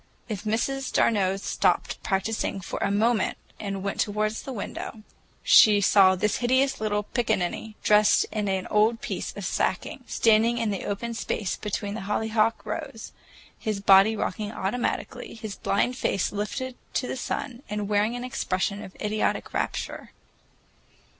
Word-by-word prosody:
If 215 Hz, -1 st, -5 dB
Miss 270 Hz, +5 st, -1 dB
d'Arnault 195 Hz, -4 st, +2 dB
stopped -, -, 0 dB
practicing 195 Hz, +1 st, -1 dB
for 185 Hz, -, -5 dB
a -, -, +1 dB
moment 215 Hz, +1 st, +1 dB, 0.2 s
and 195 Hz, -2 st, -4 dB
went 200 Hz, -, -3 dB
toward 215 Hz, 0 st, +1 dB
the 225 Hz, +4 st, -6 dB
window, 215 Hz, -1 st, -6 dB, 0.4 s
she 210 Hz, -2 st, +7 dB
saw 195 Hz, -1 st, +5 dB
this 210 Hz, +3 st, 0 dB
hideous 260 Hz, +1 st, +2 dB
little 210 Hz, -1 st, 0 dB
pickaninny, 215 Hz, -2 st, -1 dB
dressed 210 Hz, 0 st, +5 dB
in 210 Hz, -2 st, -2 dB
an 190 Hz, -1 st, -1 dB
old 220 Hz, +2 st, +3 dB
piece -, -, -4 dB
of -, -, -5 dB
sacking, -, -, -1 dB
standing 225 Hz, +1 st, +3 dB
in 225 Hz, -3 st, 0 dB
the 195 Hz, -, -4 dB
open 230 Hz, +4 st, -3 dB
space 215 Hz, -3 st, -2 dB
between 205 Hz, -1 st, -4 dB
the 225 Hz, -, -5 dB
hollyhock 220 Hz, +1 st, +1 dB
rows, -, -, -6 dB, 0.5 s
his 215 Hz, -3 st, -2 dB
body 200 Hz, +2 st, +6 dB
rocking 210 Hz, 0 st, -3 dB
automatically, 220 Hz, +4 st, -3 dB
his 220 Hz, -2 st, -6 dB
blind 245 Hz, +5 st, 0 dB
face 195 Hz, -6 st, 0 dB
lifted 230 Hz, +6 st, -3 dB, 0.2 s
to -, -, +1 dB
the -, -, -3 dB
sun 250 Hz, 0 st, -4 dB
and 210 Hz, -1 st, -2 dB
wearing 210 Hz, +3 st, +1 dB
an 245 Hz, -, -5 dB
expression 200 Hz, -4 st, -2 dB
of 190 Hz, -, -11 dB
idiotic 215 Hz, 0 st, -1 dB
rapture. -, -, -3 dB
215 Hz, 150 wpm, -26 LUFS, 200-230 Hz, 0.5 s, she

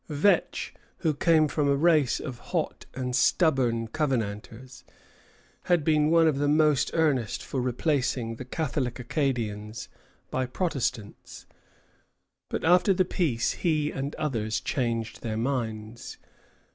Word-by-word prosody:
Vetch, 155 Hz, +7 st, +1 dB, 0.3 s
who 160 Hz, -3 st, +2 dB
came 160 Hz, +2 st, +3 dB
of 155 Hz, +1 st, -2 dB
a 140 Hz, -1 st, +3 dB
race 155 Hz, -4 st, +3 dB
of 130 Hz, -5 st, -6 dB
hot -, -, -3 dB
and 125 Hz, -1 st, -2 dB
stubborn 125 Hz, -7 st, +2 dB
Covenanters, 125 Hz, -2 st, -3 dB, 0.8 s
had 175 Hz, -4 st, +2 dB
been 150 Hz, -1 st, +3 dB
one 165 Hz, 0 st, +5 dB
of 145 Hz, -3 st, +1 dB
the 145 Hz, -, +1 dB
most 150 Hz, -1 st, +3 dB
earnest 140 Hz, -10 st, +1 dB
for 130 Hz, -, -2 dB
replacing 125 Hz, -2 st, -1 dB
the -, -, -6 dB
Catholic 130 Hz, -3 st, -2 dB
Acadians 115 Hz, -5 st, -3 dB, 0.4 s
by 130 Hz, -1 st, -1 dB
Protestants; 130 Hz, -, -3 dB, 1.0 s
but -, -, -3 dB
after 180 Hz, +3 st, +5 dB
the 185 Hz, -, +2 dB
peace 135 Hz, -11 st, 0 dB
he 155 Hz, -3 st, 0 dB
and 135 Hz, +2 st, -4 dB
others 110 Hz, -8 st, -1 dB
changed 115 Hz, -5 st, -2 dB
their 110 Hz, -2 st, -3 dB
minds. 115 Hz, -2 st, -3 dB
135 Hz, 125 wpm, -27 LUFS, 115-155 Hz, 1.0 s, one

